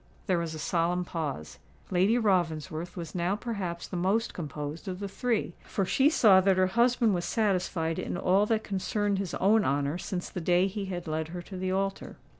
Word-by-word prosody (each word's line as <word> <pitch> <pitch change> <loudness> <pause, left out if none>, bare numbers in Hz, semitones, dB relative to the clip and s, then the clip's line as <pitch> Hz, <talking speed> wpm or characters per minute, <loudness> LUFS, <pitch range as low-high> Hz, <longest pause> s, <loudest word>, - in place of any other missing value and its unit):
There 185 -4 +1
was 165 -1 -3
a - - -5
solemn 175 +3 0
pause:—Lady 175 - -2
Ravensworth 175 -5 0
was 170 -2 -6
now 180 +2 0
perhaps 200 -7 -4
the - - -6
most 195 +6 +1
composed 150 0 -6
of 185 -1 -4
the 200 - -3
three, 205 -1 -1
for 195 - -2
she 270 +9 +4
saw 205 -11 +6
that 190 0 +3
her 185 - +4
husband 240 -2 +3
was 175 -1 -1
satisfied 180 -6 0
in - - -3
all 190 +3 +3
that 220 -1 +1
concerned 200 +1 -1
his 195 -3 -3
own 210 +3 +4
honour 145 +2 0
since 180 -1 -4
the 180 - -4
day 175 +2 +3
he 195 +1 -3
had 180 -2 -5
led 155 0 -2
her 175 +1 -7
to 190 - -10
the 185 0 -2
altar. 195 +1 -2
185 Hz, 195 wpm, -29 LUFS, 170-200 Hz, -, saw